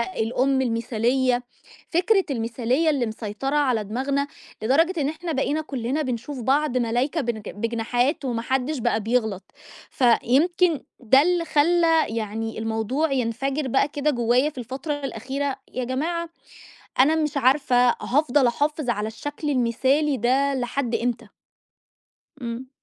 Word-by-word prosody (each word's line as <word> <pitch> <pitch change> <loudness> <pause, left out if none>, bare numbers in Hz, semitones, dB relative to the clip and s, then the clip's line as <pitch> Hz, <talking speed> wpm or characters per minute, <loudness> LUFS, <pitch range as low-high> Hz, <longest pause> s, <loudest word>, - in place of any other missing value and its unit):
الأم 250 +3 0
المثالية، 245 +2 +1 0.5
فكرة 380 +3 +3
المثالية، 245 +5 0
اللي 265 -5 0
مسيطرة 220 +6 -3
على 250 -7 +2
دماغنا، 270 +6 -1 0.4
لدرجة 325 +9 +2
إن 280 - +1
إحنا 325 +2 -4
بقينا 290 +2 0
كُلّنا 275 0 -2
بنشوف 255 +1 -4
بعض 275 +1 +1
ملايكة 245 +7 0
بنج 230 -5 -3
بجناحات، 235 +6 -1
وما 235 -3 -2
حدش 265 +3 -1
بقى 225 - 0
بيغلط، 220 -3 0 0.5
فيمكن 300 +7 +3 0.2
ده 265 +3 +5
اللي 350 0 +1
خلّى 325 +1 +3
يعني 225 0 -4
الموضوع 225 +7 -1
ينفجِر 265 +3 -1
بقى 270 +3 +2
كده 295 0 0
جوايا 245 +3 +2
في 275 - -12
الفترة 265 +6 -4
الأخيرة، 270 +3 -3 0.2
يا 255 -1 -2
جماعة 330 +7 -2 0.7
أنا 300 +5 +5
مش 300 -3 -1
عارفة 255 -2 +3
هافضل 275 -1 +2
أحافظ 290 +2 -1
على 210 -2 -1
الشكل 290 +6 -5
المثالي 265 +3 +1
ده 270 +4 +2
لحد 245 -1 -2
إمتى؟ 235 -2 -2 1.2
إمم. 235 +2 -5
260 Hz, 130 wpm, -24 LUFS, 235-295 Hz, 1.2 s, ده